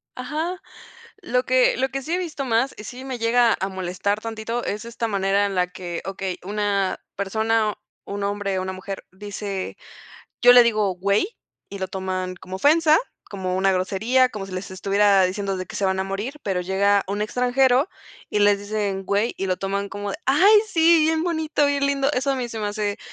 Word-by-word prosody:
Ajá. 315 +8 -3 0.6
Lo - - 0
que - - +3
lo 265 - 0
que 270 +1 -4
sí 320 +6 -4
he - - +2
visto 315 -6 -4
más 240 +3 +1
y 210 - -8
sí 255 +4 -8
me 260 -2 -4
llega 230 0 +3
a 190 - -1
molestar 190 +2 -2
tantito 225 +1 -4
es 210 +3 -4
esta 235 0 -3
manera 200 0 +1
en 195 -1 -3
la 180 0 +2
que 175 -1 -6
okey, 190 -1 -4
una 200 -1 -1 0.2
persona, 220 +2 0 0.3
un 200 0 -4
hombre 200 -1 -1
o - - -2
una 190 0 -4
mujer 195 +1 -7
dice: 200 0 -5 0.7
"Yo 245 0 +9
le 245 -1 +9
digo 215 -5 +1
güey, 200 - +1 0.4
y 200 - -6
lo 190 -1 -3
toman 185 -1 -3
como 185 +1 -7
ofensa, 310 +5 +5 0.3
como 185 -2 -3
una 195 0 +3
grosería, 220 +8 +2
como 210 -5 -6
si 190 - -10
les 185 +1 -5
estuviera 200 +1 +3
diciendo 195 +1 -2
de 185 - -4
que - - -8
se 200 - -1
van 190 0 0
a 190 - 0
morir", 205 +8 -4
pero 190 -3 -1
llega 195 +2 +2
un 205 +2 -2
extranjero 250 - +2 0.4
y 210 - 0
les 205 -1 +5
dicen: 205 -2 -3
"Güey", 205 +5 0
y 195 - -1
lo 185 -1 0
toman 200 +1 -2
como: 205 0 -5
"Ay, 390 +10 +6
sí, 330 -1 +5
bien 315 +1 +2
bonito, 315 -3 0
bien 280 0 +1
lindo". 280 0 +1
Eso 270 +2 0
a - - -2
mí 245 -2 -3
se 225 - -6
me 210 - -2
hace, 205 -1 -2
205 Hz, 200 wpm, -23 LUFS, 195-255 Hz, 0.7 s, Yo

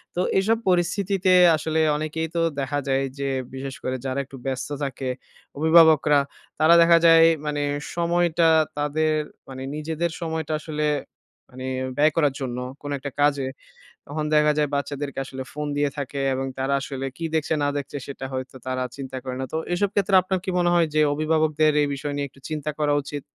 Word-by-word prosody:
তো 180 - +1 0.2
এসব 220 +4 +2
পরিস্থিতিতে 185 +1 +1 0.2
আসলে 160 +1 -1 0.2
অনেকেই 155 +1 -3
তো 170 - +2 0.2
দেখা 140 +1 -1
যায় 135 0 +1 0.2
যে, 140 0 -1 0.2
বিশেষ 135 0 -6
করে 130 - -1
যারা 130 +1 -1
একটু 135 0 -12
ব্যস্ত 130 0 -3
থাকে, 135 -1 -3 0.5
অভিভাবকরা 160 -2 +6 0.4
তারা 160 +2 +6
দেখা 170 0 +6
যায়, 165 0 +8 0.2
মানে 150 -1 -1 0.3
সময়টা 170 -1 +2 0.3
তাদের 155 +2 +1 0.4
মানে 130 0 -7
নিজেদের 160 +2 -2
সময়টা 160 -2 -3
আসলে 150 -1 -3 0.7
মানে 130 0 -8 0.3
ব্যয় 150 +2 +4
করার 150 -4 +2
জন্য 125 -2 -3 0.2
কোন 145 - -6
একটা 140 +1 -6
কাজে। 145 -2 +2 0.6
তখন 150 +1 -3
দেখা 150 0 +5
যায়, 150 -1 +2
বাচ্চাদেরকে 140 0 -3
আসলে 130 0 -7
ফোন 150 0 -4
দিয়ে 145 0 +1
থাকে 140 0 -4
এবং 135 +1 -2
তারা 135 +1 -1
আসলে 135 0 -5
কী 165 - -6
দেখছে 160 0 +1
না 145 - +2
দেখছে, 140 0 -5
সেটা 135 -1 -7
হয়তো 130 0 -5
তারা 130 0 -1
চিন্তা 130 -1 -6
করে 130 -1 -4
না। - - -2
তো 160 - -1 0.2
এসব 200 +3 +1
ক্ষেত্রে 195 -1 +1
আপনার 185 +1 -1
কি 190 - -2
মনে 175 0 +3
হয় 170 -1 +4
যে, 155 - +3
অভিভাবকদের 155 0 +2
এই 145 - 0
বিষয় 145 +1 -4
নিয়ে 145 0 -1
একটু 135 +1 -22
চিন্তা 155 -1 -3
করা 150 -1 +1
উচিত? 145 0 -6
150 Hz, 180 wpm, -24 LUFS, 135-160 Hz, 0.7 s, যায়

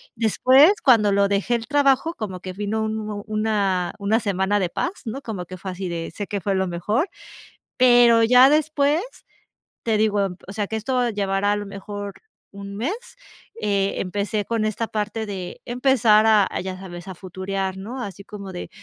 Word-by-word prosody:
Después, 255 - +5
cuando 225 -6 +5
lo 200 0 +3
dejé, 200 +4 0
el 230 -1 -4
trabajo, 290 +2 +2
como 190 -5 -5
que 185 0 -7
vino 210 +2 -2
un 215 -1 -3
una 205 -5 0
una 205 +3 +2
semana 200 0 0
de 180 - 0
paz, 355 - -3
¿no?, 245 +5 -5
como 195 -8 -5
que 185 +1 -9
fue 190 +1 -6
así 180 0 -5
de: 165 -1 -4
"Sé 205 - -4
que 205 - -3
fue 195 +2 0
lo 190 0 0
mejor". 210 - -1 0.7
Pero 240 -2 +6
ya 250 +3 +7
después, 305 0 +2 0.8
te 225 -2 +1
digo, 210 -1 +2
em, 185 -2 -3
o 195 - -7
sea, 205 -1 -2
que 220 - -4
esto 245 +2 0
llevará, 200 -1 0
a - - 0
lo 205 0 -4
mejor, 200 0 -7 0.4
un 200 0 -8
mes, 265 - -1 0.7
eh, 200 -1 0
empecé 205 +2 -2
con 230 -2 -1
esta 220 +1 -2
parte 215 +1 -3
de 190 -4 -6
empezar 240 -4 +3
a 215 -3 +5
a, - - -3
ya 185 0 -5
sabes, 180 -1 -9
a 190 - -7
futurear, 190 +1 -4
¿no?, 235 +7 -6
así 200 -2 -7
como 200 -2 -9
de: 175 - -6
205 Hz, 190 wpm, -23 LUFS, 195-230 Hz, 0.8 s, ya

